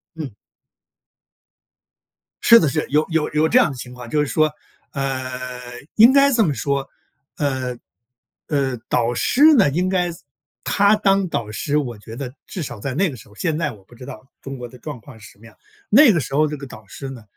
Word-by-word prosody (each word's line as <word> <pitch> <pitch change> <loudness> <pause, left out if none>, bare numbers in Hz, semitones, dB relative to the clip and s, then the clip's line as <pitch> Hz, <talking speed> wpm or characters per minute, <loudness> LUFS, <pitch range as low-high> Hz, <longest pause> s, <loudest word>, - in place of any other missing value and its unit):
嗯。 150 -8 -6 2.1
是 230 - +9
的， 160 - +1
是， 155 +2 -1
有 150 +2 +2
有 160 -2 0
有 155 +1 +3
这 235 - +3
样 245 - +4
的 135 - -9
情 125 0 -9
况， 125 -1 -10
就 150 - 0
是 150 - +1
说， 155 +2 +2 0.4
呃， 135 -2 -3 0.6
应 225 +3 +8
该 280 +1 +5
这 230 -2 +4
么 155 -7 +1
说， 140 +2 -2 0.5
呃， 130 -3 -2 0.7
呃， 135 -4 -1
导 120 -1 +1
师 250 - 0
呢， 215 - +5
应 175 +6 0
该 180 -2 0 0.6
他 200 +1 +3
当 195 -2 +2
导 115 -8 -3
师， 140 +7 -1
我 125 -6 -3
觉 110 +2 -11
得 130 -2 -6
至 185 - -6
少 120 -8 -7
在 135 - -3
那 180 +6 +1
个 135 - -7
时 110 - -15
候 105 - -19
现 160 +4 -1
在 155 -3 -1
我 105 -4 -15
不 120 - -18
知 125 +2 -11
道 130 -1 -11
中 135 0 -7
国 125 -1 -7
的 125 - -15
状 145 0 -8
况 125 0 -14
是 - - -13
什 - - -25
么 115 - -17
样， 115 - -16 0.3
那 260 +3 +7
个 175 - +1
时 135 -1 -4
候 155 +2 +4
这 150 0 -4
个 140 0 -9
导 110 -4 -13
师 135 +7 -8
呢， 125 -4 -10
140 Hz, 230 characters per minute, -21 LUFS, 125-165 Hz, 2.1 s, 是